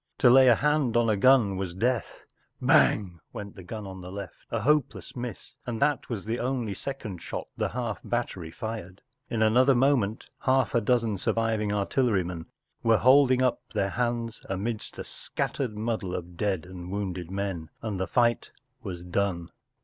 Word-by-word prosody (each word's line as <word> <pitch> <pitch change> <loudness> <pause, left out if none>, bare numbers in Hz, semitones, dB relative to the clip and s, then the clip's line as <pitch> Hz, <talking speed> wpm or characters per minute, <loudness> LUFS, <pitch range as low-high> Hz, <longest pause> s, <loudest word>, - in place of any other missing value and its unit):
To 125 - +6
lay 130 +1 +8
a 120 - +7
hand 150 -5 +2
on 115 -1 +3
a - - +2
gun 110 -3 +4
was 95 -2 -4
death* 120 +3 -1 0.2
“ - - -9
Hang! 90 -5 +4
” - - -47
went 100 -1 -7
the 95 - -9
gun 105 +4 -7
on 95 -1 -8
the 90 0 -8
left, 100 -1 -8
a 115 - -1
hopeless 135 - +1
miss, 125 -1 -6
and 115 -2 -3
that 145 -1 +1
was 110 -5 -4
the 115 +2 -2
only 125 -4 -1
second 110 -6 -6
shot - - -5
the - - -1
half 120 -3 -3
battery 105 -8 -3
fired* 100 -1 -6 0.3
In 110 -1 +1
another 130 +5 +5
moment 120 -4 +2
half 130 -2 +2
a 120 - +3
dozen 115 -2 +1
sur¬ - - 0
viving 110 -2 0
artillerymen 100 -5 0 0.3
were 115 -1 +4
holding 130 0 +5
up 125 - +1
their 100 0 +1
hands 120 -1 -2
amidst 105 +4 -3
a - - -4
Scattered 120 -6 -3
muddle 110 -4 -2
of 90 0 -6
dead 95 -3 -1
and 90 -1 -9
wounded 95 -3 -3
men, 95 -5 -3
and 105 -4 -3
the 95 - -1
fight 120 -1 +2 0.3
was 90 -5 -6
done. 90 -1 -1
110 Hz, 180 wpm, -27 LUFS, 95-125 Hz, 0.3 s, lay